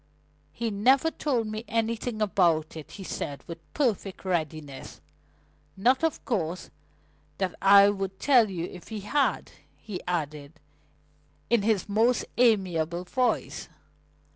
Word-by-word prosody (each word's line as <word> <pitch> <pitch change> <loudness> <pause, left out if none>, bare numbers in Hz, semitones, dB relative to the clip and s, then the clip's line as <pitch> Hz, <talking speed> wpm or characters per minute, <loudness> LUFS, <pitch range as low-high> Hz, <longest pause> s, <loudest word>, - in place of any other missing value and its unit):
"He 230 -1 -3
never 260 +10 +3
told 255 -9 -1
me 215 +1 -5
anything 230 0 -1
about 170 -6 +2
it," 155 -2 -9
he 195 - -8
said 145 -5 -5
with 170 -1 -8 0.2
perfect 205 -9 -1
readiness. 155 -6 -4 0.8
"Not, 255 +9 +3
of 325 -2 -1
course, 180 - -2 0.7
that 190 -2 -1
I 200 +1 +8
would 195 -1 -3
tell 245 -6 +5
you 175 -3 -4
if 180 -1 -11
he 220 -2 -6
had," 275 +8 0 0.3
he 205 -5 -7
added, 150 -4 -3 1.0
in 235 -3 +4
his 210 -2 +1
most 225 +4 +2
amiable 180 -7 +2
voice. 250 +7 -1
200 Hz, 125 wpm, -27 LUFS, 175-230 Hz, 1.0 s, I